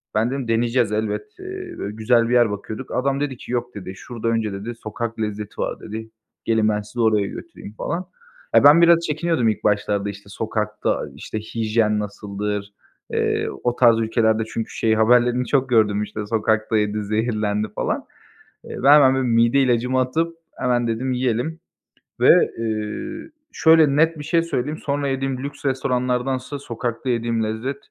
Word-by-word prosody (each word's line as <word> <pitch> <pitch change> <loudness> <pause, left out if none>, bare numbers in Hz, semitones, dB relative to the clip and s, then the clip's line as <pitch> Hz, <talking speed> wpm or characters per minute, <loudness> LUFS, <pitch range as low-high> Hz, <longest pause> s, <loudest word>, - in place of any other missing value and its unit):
ben 110 +3 +2
dedim 135 -3 -3
“Deneyeceğiz 115 0 +1
elbet, 105 - -1
eee, 375 -1 -7
böyle 105 - -5
güzel 115 +1 +2
bir - - +1
yer 120 -3 +5
bakıyorduk“. 110 +5 -6
Adam 135 +2 0
dedi 140 -4 -2
ki - - -10
“Yok.“ 120 -1 -2
dedi, 95 -1 -7
“Şurada 115 0 -6
önce" 115 -3 0
dedi, 110 +4 -6
"sokak 115 +1 -5
lezzeti 105 -1 -4
var." - - -3
dedi. 110 +1 -7 0.4
"Gelin, 110 -1 +2
ben 105 0 0
sizi 115 +3 -5
oraya 105 -3 +3
götüreyim.“ 105 - -9
falan. 180 +2 -3 0.5
Ya, - - +7
ben 150 +4 +8
biraz 170 0 +6
çekiniyordum 155 -6 +1
ilk 110 - -3
başlarda, 100 -1 +1
işte, 100 0 -10
sokakta, 105 0 -2
işte, 110 - -5
hijyen 110 -1 0
nasıldır, 105 0 -4 0.4
eee, - - 0 0.2
o 120 0 +1
tarz 115 -2 +5
ülkelerde 110 0 +2
çünkü 115 - -3
şey 110 -1 +1
haberlerini 120 +2 +3
çok 135 -2 +1
gördüm 105 -3 +3
işte 105 0 -6
sokakta 110 0 +1
yedi, 105 0 0
zehirlendi 105 -1 -1
falan. - - -2 0.6
Eee, - - -8
ben 140 +2 +8
hemen 130 -1 +5
bir 130 -2 0
mide 115 +3 +3
ilacımı 125 0 +2
atıp 165 +6 -1 0.2
hemen 120 -1 +1
dedim 120 +3 -1
yiyelim 125 +6 -1 0.6
ve, - - +5
eee, 115 - -4 0.2
şöyle 160 -3 +5
net 160 0 +3
bir - - -6
şey 165 +2 +2
söyleyeyim, 150 -1 -2
sonra 140 0 -1
yediğim 135 -1 -1
lüks 145 0 -7
restoranlardansa 130 +1 -1
sokakta 120 0 -4
yediğim 115 -1 0
lezzet, 110 +6 -3
115 Hz, 165 wpm, -22 LUFS, 110-130 Hz, 0.6 s, ben